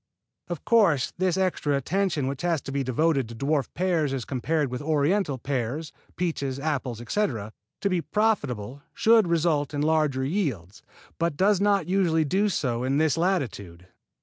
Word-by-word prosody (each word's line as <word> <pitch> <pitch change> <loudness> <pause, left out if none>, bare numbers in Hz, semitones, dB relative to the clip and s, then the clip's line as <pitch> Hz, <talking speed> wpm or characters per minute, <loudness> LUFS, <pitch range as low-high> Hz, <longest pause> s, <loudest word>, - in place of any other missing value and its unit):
Of 175 -3 -6
course, 205 - +3
this 185 -1 +1
extra 180 -6 0
attention 170 +1 0
which 135 0 -3
has 170 -3 +1
to - - -7
be 140 0 -1
devoted 135 0 +1
to 115 - -8
dwarf 140 +3 0
pears 170 -6 +1
as 130 -3 -3
compared 145 +1 -1
with 125 - -4
Oriental 150 +1 +1
pears, 135 +4 -3 0.2
peaches, 140 -6 -2
apples, 140 -6 -2
etc., 120 - -2 0.3
to - - +1
be 180 -2 +1
profitable 140 - -1
should 225 -3 +4
result 160 -3 +1
in 145 - -1
larger 150 -4 +1
yields, 130 - -2 0.4
but 170 -3 0
does 200 0 +3
not 200 -4 +2
usually 175 -4 +2
do 195 +8 +1
so 125 -9 -1
in 135 +2 +1
this 155 -2 +2
latitude. 110 - -2
150 Hz, 160 wpm, -26 LUFS, 130-180 Hz, 0.4 s, should